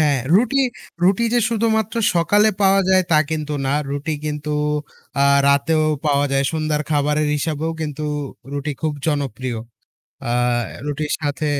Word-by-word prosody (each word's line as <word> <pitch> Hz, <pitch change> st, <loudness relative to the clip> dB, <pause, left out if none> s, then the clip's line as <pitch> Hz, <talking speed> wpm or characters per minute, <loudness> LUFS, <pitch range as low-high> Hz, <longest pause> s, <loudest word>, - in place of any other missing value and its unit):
হ্যাঁ, 145 Hz, -3 st, +3 dB, 0.2 s
রুটি 240 Hz, +7 st, +3 dB, 0.5 s
রুটি 190 Hz, +5 st, +3 dB
যে -, -, +5 dB
শুধুমাত্র 220 Hz, -2 st, 0 dB, 0.2 s
সকালে 205 Hz, +5 st, +4 dB
পাওয়া 195 Hz, 0 st, +5 dB
যায় 190 Hz, 0 st, +5 dB
তা 155 Hz, -, +5 dB
কিন্তু 155 Hz, -1 st, -2 dB
না। -, -, 0 dB, 0.2 s
রুটি 145 Hz, +3 st, -3 dB
কিন্তু 150 Hz, 0 st, -3 dB, 0.7 s
আ -, -, +5 dB, 0.2 s
রাতেও 155 Hz, +3 st, +3 dB, 0.2 s
পাওয়া 145 Hz, -1 st, +3 dB
যায়। 135 Hz, 0 st, +2 dB
সন্ধ্যার 155 Hz, -1 st, -1 dB
খাবারের 150 Hz, 0 st, +1 dB
হিসাবেও 155 Hz, +2 st, -2 dB
কিন্তু 150 Hz, -1 st, -4 dB, 0.5 s
রুটি 145 Hz, +1 st, -3 dB
খুব 155 Hz, -1 st, 0 dB
জনপ্রিয়। 130 Hz, -5 st, -2 dB, 0.7 s
আ -, -, -1 dB, 0.6 s
রুটির 150 Hz, +1 st, -2 dB
সাথে 145 Hz, 0 st, -2 dB
155 Hz, 140 wpm, -20 LUFS, 145-170 Hz, 0.7 s, যে